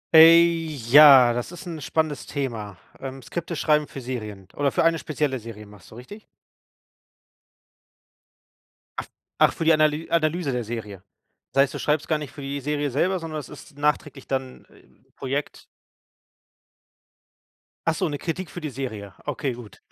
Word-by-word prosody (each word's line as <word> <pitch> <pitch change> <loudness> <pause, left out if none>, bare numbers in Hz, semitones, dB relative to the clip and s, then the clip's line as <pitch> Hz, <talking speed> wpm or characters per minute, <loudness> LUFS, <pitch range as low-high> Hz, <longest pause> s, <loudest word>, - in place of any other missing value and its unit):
Äh, 165 +1 +9 0.5
ja, 135 -5 +9
das 120 +7 -4
ist 175 +2 -10
'n 165 -4 -6
spannendes 155 0 -2
Thema. 115 -9 -4 0.2
Ähm, 135 -1 -7
Skripte 170 0 -5
schreiben 150 -1 +2
für 135 - -8
Serien 110 -6 -6
oder 140 -2 +1
für - - +1
eine 165 -1 +3
spezielle 145 -4 -2
Serie 110 -1 -10
machst 105 -3 -16
du, - - -14
richtig? 205 - -11 2.7
Af - - -4 0.3
ach, - - +5
für 165 - -4
die 160 - +6
Analy 155 +1 +1
Analyse 165 -2 +1
der 125 -1 -2
Serie. 105 -4 -7 0.5
Das 135 - +4
heißt, 140 - -3
du - - -5
schreibst 150 0 0
gar 155 - +1
nicht 150 -3 -7
für 145 - -10
die 140 +1 -4
Serie 145 +1 -1
selber, 180 +7 +1
sondern 160 -2 -5
es 140 - -10
ist 145 - -13
nachträglich 145 -2 -1
dann, 130 -1 -4
äh - - -22 0.3
Projekt? 140 +2 -4 2.2
Ach 165 -1 +2
so, 180 - 0
'ne 145 -2 -3
Kritik 175 +3 -4
für 175 - -8
die 155 - -4
Serie. 110 -7 -6
Okay, 135 -4 -2
gut. 120 -3 -12
145 Hz, 165 wpm, -24 LUFS, 125-155 Hz, 2.7 s, Äh